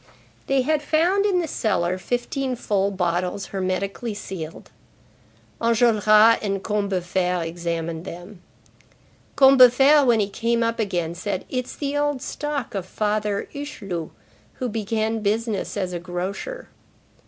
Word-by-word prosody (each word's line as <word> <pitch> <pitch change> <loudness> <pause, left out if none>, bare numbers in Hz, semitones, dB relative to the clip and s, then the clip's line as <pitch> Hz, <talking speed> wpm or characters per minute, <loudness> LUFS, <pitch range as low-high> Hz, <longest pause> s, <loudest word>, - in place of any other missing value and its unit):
They 270 -1 +2
had 305 +2 +1
found 350 +7 +2
in 365 -3 +2
the 330 - -3
cellar 185 - 0
fifteen 250 +4 -2
full 200 -4 0
bottles 180 0 -1
hermetically 195 +4 -2
sealed. 170 -6 -7 0.9
Enjolras 225 -1 +5
and 195 -2 -2
Combeferre 185 -4 -1
examined 165 -1 -4
them. 180 +1 -10 0.9
Combeferre 270 +2 +7
when 240 -4 +4
he 205 - +1
came 230 +3 0
up 230 0 -1
again 175 -6 -1
said:—"It's 205 +7 -4
the 285 -1 -3
old 290 -2 0
stock 295 -4 -4
of 190 -3 -4
Father 210 0 -1
Hucheloup, 200 - -5 0.4
who 255 -2 -4
began 220 +1 -1
business 215 0 -1
as 185 -2 -2
a 175 - -3
grocer." 190 - -5
210 Hz, 120 wpm, -23 LUFS, 185-250 Hz, 0.9 s, Combeferre